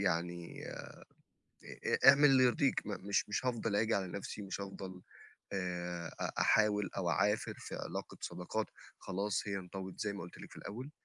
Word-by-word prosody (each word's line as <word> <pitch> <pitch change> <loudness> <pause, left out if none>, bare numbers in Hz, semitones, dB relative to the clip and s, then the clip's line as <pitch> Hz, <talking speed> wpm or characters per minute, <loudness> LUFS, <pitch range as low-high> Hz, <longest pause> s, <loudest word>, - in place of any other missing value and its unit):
يعني 85 0 -1
آآ - - -6 1.0
أ - - +7
اعمل 145 +1 +8
اللي 135 -2 +7
يرضيك، 130 +2 +3
م 100 -1 -5
مش 100 - +2
مش 115 - -1
هافضل 115 -4 0
آجي 110 +1 +3
على 95 -2 0
نَفْسي 100 +3 -5
ومش 100 0 -4
هافضَل 95 -2 -6 0.5
آآ 90 -3 -2
أ - - 0
أحاول 105 -2 +4
أو 90 -3 +1
أعافر 105 +1 +2
في - - -7
علاقة - - -5
صداقات 90 +5 -2 0.3
خلاص 100 +2 -1
هي 100 - 0
انطوت 95 0 -7
زي 100 -1 0
ما 100 - -6
قُلت 85 - -10
لِك - - -10
في - - -11
الأول، 125 +8 -6
100 Hz, 175 wpm, -35 LUFS, 90-105 Hz, 1.0 s, اعمل